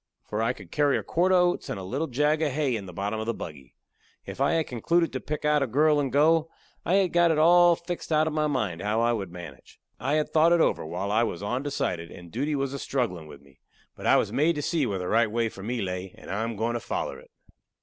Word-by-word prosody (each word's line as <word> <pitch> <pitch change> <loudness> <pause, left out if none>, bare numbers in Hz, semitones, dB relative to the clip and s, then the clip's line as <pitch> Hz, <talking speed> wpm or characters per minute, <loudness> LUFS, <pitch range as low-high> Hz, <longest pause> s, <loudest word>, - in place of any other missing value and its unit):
For 105 +1 -3
I 115 +2 +1
could 100 -8 -14
carry 145 -1 +2
a - - -4
quart 180 +3 +1
of 185 - +6
oats 180 0 +1
and - - -3
a - - -7
little 135 +12 -2
jag 150 +4 +1
of 155 -3 +1
hay 140 -4 0
in 100 -3 -5
the - - -8
bottom 100 +4 -3
of 110 - -4
the 115 - -1
buggy. 70 -6 -9 0.5
If - - -7
I - - +3
had 160 -1 +1
concluded 165 +7 0
to 130 - -2
pick 150 +2 -5
out 150 -1 +3
a 140 - +1
girl 150 +5 +3
and 135 -3 -1
go, 160 +4 +3 0.3
I 180 - +1
had 190 -3 +2
got 175 0 +4
it 160 - +2
all 175 +2 +6
fixed 170 0 -6
out 155 0 +4
in 155 - -2
my 155 0 +1
mind 105 - -2
how 105 +2 0
I 120 0 +2
would 100 -6 -4
manage. 85 -6 -11 0.2
I 135 +5 -1
had 155 0 +1
thought 160 +2 +5
it 170 - +3
over, - - +2
while 90 +5 -4
I 110 +2 +3
was 100 -5 -2
ondecided 105 -8 -2
and 85 -1 -12
duty 145 +6 -1
was 135 -1 -2
a 140 - -4
strugglin' 105 - -2
with 70 -2 -12
me. 70 -1 -23 0.4
But - - -5
I - - +6
was - - +1
made 160 +4 +2
to 145 - -3
see 155 -5 0
where 100 - -2
the 90 -1 -4
right 115 +2 +3
way 115 +1 0
for 100 - -11
me 115 +2 -2
lay, 90 0 -5
and - - -10
I 105 +3 -1
am 115 0 -4
goin' 115 +3 -1
to 120 - -2
foller - - -4
it. - - -18
125 Hz, 275 wpm, -26 LUFS, 100-155 Hz, 0.5 s, of